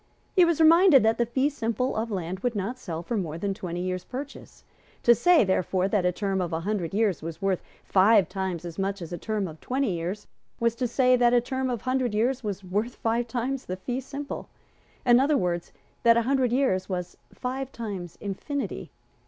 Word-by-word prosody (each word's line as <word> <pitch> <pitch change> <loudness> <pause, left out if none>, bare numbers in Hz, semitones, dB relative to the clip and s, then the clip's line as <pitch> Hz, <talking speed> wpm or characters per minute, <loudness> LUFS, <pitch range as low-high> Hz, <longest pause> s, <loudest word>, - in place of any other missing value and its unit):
He 365 -3 +7
was 335 -2 +1
reminded 325 - +7
that 225 +1 +2
the 235 - +2
fee 260 +4 +1
simple 235 -1 -1
of 225 +1 -2
land 185 -2 -3
would 240 +2 -1
not 215 +6 -3
sell 170 -7 -5
for 235 - -3
more 165 -6 -2
than 195 +3 -2
twenty 175 -2 -5
years' 185 0 -2
purchase. 275 +2 -8 0.4
To 235 - +7
say, 350 +6 +5
therefore, 185 -1 +1
that 195 -3 +2
a - - +2
term 195 0 -1
of 175 - -2
a 160 0 -2
hundred 190 -3 -2
years 205 -4 +1
was 165 0 -6
worth 195 -1 0 0.2
five 200 -1 +5
times 185 -3 -4
as 170 +1 -7
much 195 -1 -2
as 170 - -8
a 175 - -4
term 215 -1 -2
of 160 -1 -10
twenty 265 -3 0
years, 175 +4 -4 0.3
was 235 -1 +2
to 250 - 0
say 255 +1 +3
that 240 0 +4
a - - +6
term 260 +2 -2
of 240 -4 -2
a - - -23
hundred 255 -3 0
years 245 +4 +1
was 200 -2 -4
worth 205 +6 -2
five 235 +1 -1
times 255 +3 -3
the 185 - -3
fee 245 +7 -3
simple; 280 +2 -6 0.6
in 240 -1 +6
other 285 +2 +3
words, 175 -6 -2 0.3
that 230 0 +5
a 235 - +3
hundred 260 -1 +1 0.4
was 180 -2 -4 0.2
five 260 +1 -4
times 200 -8 -6
infinity. 270 +8 -4
220 Hz, 210 wpm, -26 LUFS, 185-255 Hz, 0.6 s, He